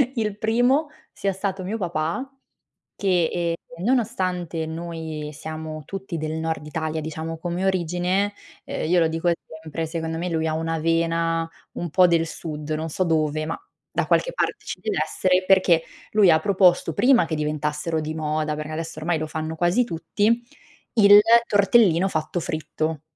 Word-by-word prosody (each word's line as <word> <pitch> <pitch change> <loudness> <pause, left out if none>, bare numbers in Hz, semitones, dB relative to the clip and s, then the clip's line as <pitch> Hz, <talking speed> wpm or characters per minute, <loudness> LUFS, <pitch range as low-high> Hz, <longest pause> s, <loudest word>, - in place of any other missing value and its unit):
il 210 -3 -1
primo 245 +7 +2 0.2
sia 195 - -1
stato 190 0 -3
mio 210 +5 -3
papà 175 - -2 0.7
che, 180 -4 +2
ehm, 170 0 -3
nonostante 185 -9 0
noi 160 -2 -5
siamo 155 +1 -6
tutti 195 -3 -5
del 155 0 -3
nord 160 -1 -3
Italia 155 +1 -3
diciamo 160 +1 -5
come 175 +2 -3
origine, 185 +2 0 0.3
uhm, - - -4
io 180 0 +4
lo 165 - +4
dico 165 +2 0 0.3
sempre, 160 +1 -3
secondo 160 0 -3
me 175 +2 -2
lui 160 -1 0
ha 155 - 0
una 165 0 -1
vena 165 0 +1 0.2
un 175 - -4
po' 180 +3 +5
del 165 -1 +2
sud- 155 -2 -6
non 160 +1 -3
so 185 - 0
dove, 155 -2 +1
ma 165 - -3 0.3
da - - 0
qualche - - +2
parte - - -2
ci - - -5
deve 425 -3 -2
essere- 185 0 +1
perché 185 -4 +5 0.3
lui 210 -4 +5
ha 160 - +5
proposto 180 -3 +3
prima 240 - +4
che 160 -1 -3
diventassero 150 +1 -1
di 155 +1 -4
moda- 155 0 -1
perché 155 +1 -6
adesso 160 0 -5
ormai 165 +1 0
lo 155 - -3
fanno 155 +1 -4
quasi 175 +8 +2
tutti- 205 +7 0 0.5
il 205 -2 +9 0.3
tortellino 200 -3 +4
fatto 160 0 -2
fritto. 155 -2 -3
165 Hz, 165 wpm, -23 LUFS, 160-190 Hz, 0.7 s, il